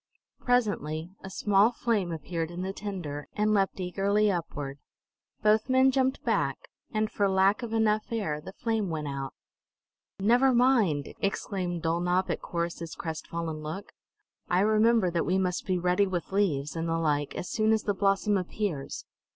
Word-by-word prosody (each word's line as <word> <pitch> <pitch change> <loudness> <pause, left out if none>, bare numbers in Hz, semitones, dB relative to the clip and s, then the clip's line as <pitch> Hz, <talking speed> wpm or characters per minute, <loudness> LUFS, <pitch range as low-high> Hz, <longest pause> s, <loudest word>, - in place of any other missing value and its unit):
Presently 185 - 0
a 190 - -6
small 205 +3 +3
flame 220 -7 0
appeared 165 +1 -3
in 175 +1 -5
the 190 +1 -3
tinder, 175 -9 -5
and 215 0 +2
leaped 195 -1 +1
eagerly 200 +3 +1
upward. 145 -5 -4 0.6
Both 215 +3 +3
men 260 +1 +5
jumped 265 0 +1
back, - - +1 0.3
and 215 -1 0
for 200 -1 +1
lack 190 +4 +3
of 235 -2 -5
enough 215 -1 +1
air 195 -10 -2
the 190 - -9
flame 220 -1 -1
went 155 -2 -3
out. 135 -2 -5 0.8
"Never 245 +6 +4
mind!" 230 - +3
exclaimed 185 -3 -2
Dulnop 175 +3 +1
at - - -3
Corrus's 170 -1 -4
crestfallen 160 0 -4
look. 160 +7 -6 0.6
"I 180 +1 +3
remember 215 -2 +4
that 170 -1 0
we 185 +2 +1
must 185 -1 -1
be 185 -1 +1
ready 180 +3 +2
with 180 -1 -3
leaves, 160 -8 0
and 165 0 -2
the 165 - +1
like, 145 -3 0
as - - -4
soon 215 0 +2
as 220 -1 +2
the 205 - 0
blossom 195 +1 +2
appears. 180 -5 -4
190 Hz, 160 wpm, -28 LUFS, 165-215 Hz, 0.8 s, men